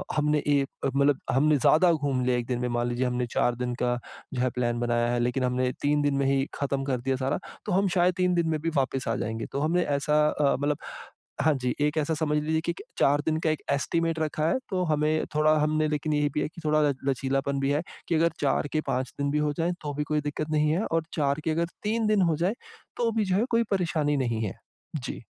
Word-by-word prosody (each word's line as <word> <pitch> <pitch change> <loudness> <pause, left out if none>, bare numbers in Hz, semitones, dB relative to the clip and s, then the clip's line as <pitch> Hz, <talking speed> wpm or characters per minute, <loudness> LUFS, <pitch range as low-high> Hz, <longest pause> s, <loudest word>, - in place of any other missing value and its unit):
हमने 150 0 +2
एक 140 -2 +3 0.3
मतलब 140 0 +3
हमने 150 +4 +4
ज़्यादा 160 +6 +5
घूम 140 -5 0
लिया 125 -1 +2
एक 120 - -2
दिन 125 -1 -1
में, 125 - -1
मान 120 0 0
लीजिए 120 +2 -1
हमने 125 0 0
4 120 - +1
दिन 125 0 -3
का 125 0 +1 0.4
जो 125 - -1
है 130 - +2
प्लान 120 -1 0
बनाया 120 0 +1
है 120 - 0
लेकिन 125 +2 0
हमने 125 0 +1
3 145 +1 +2
दिन 145 -1 +1
में 140 - +1
ही 135 0 +2
ख़त्म 140 -1 -1
कर 135 -2 0
दिया 135 +2 0
सारा, 130 +1 -1 0.3
तो 210 - -3
हम 195 +2 +3
शायद 180 0 +4
3 180 -1 +2
दिन 170 -1 +1
में 155 -1 0
भी 165 - 0
वापिस 135 -1 0
आ - - +1
जाएँगे। 110 +1 -3
तो 140 - -2
हमने 170 +4 +2
ऐसा 150 +1 +2
अ, 145 -2 +2
मतलब 145 0 0 0.6
हाँ 155 +2 +4
जी, 125 -2 -2
एक 150 +1 +1
ऐसा 155 +1 +1
समझ 150 -1 0
लीजिए 160 +1 0
कि 170 +1 -2
के - - -11 0.2
4 145 +1 +4
दिन 155 -1 +1
का 160 - +1
एक 155 - -3
एस्टिमेट 165 +3 0
रखा 155 0 0
है, - - +2
तो 185 -2 0
हमें 155 0 +1
थोड़ा 155 0 +4
हमने 155 +1 +1
लेकिन 150 0 -1
ये 145 0 +2
भी 150 - 0
है - - 0
कि 170 - -12
थोड़ा 155 0 +3
ल - - +1 0.2
लचीलापन 135 +1 0
भी 135 +1 +1
है, 145 +2 +1 0.3
कि 170 - +1
अगर 165 +1 +3
4 145 0 +1
के 155 - +1
5 130 -1 -1
दिन 140 0 0
भी 150 - +1
हो 150 -1 0
जाएँ, 170 +2 +1
तो 145 -1 -4
भी 150 +1 -2
कोई 150 0 -1
दिक्क़त 150 +1 -3
नहीं 150 0 +2
है, 175 +7 +1
और 165 0 0
4 140 -1 0
के 160 - +1
अगर 165 +2 +1 0.2
3 220 +1 0
दिन 210 -2 +3
हो - - +1
जाएँ, 180 +7 0 0.4
तो 235 -1 +1
भी 215 - +2
जो 185 -1 +1
है 215 +5 +2
कोई 230 0 +3
परेशानी 165 -6 +1
नहीं 120 -4 -1
है। 95 - -3 0.4
जी। 130 -4 -5
150 Hz, 255 wpm, -27 LUFS, 135-160 Hz, 0.6 s, ज़्यादा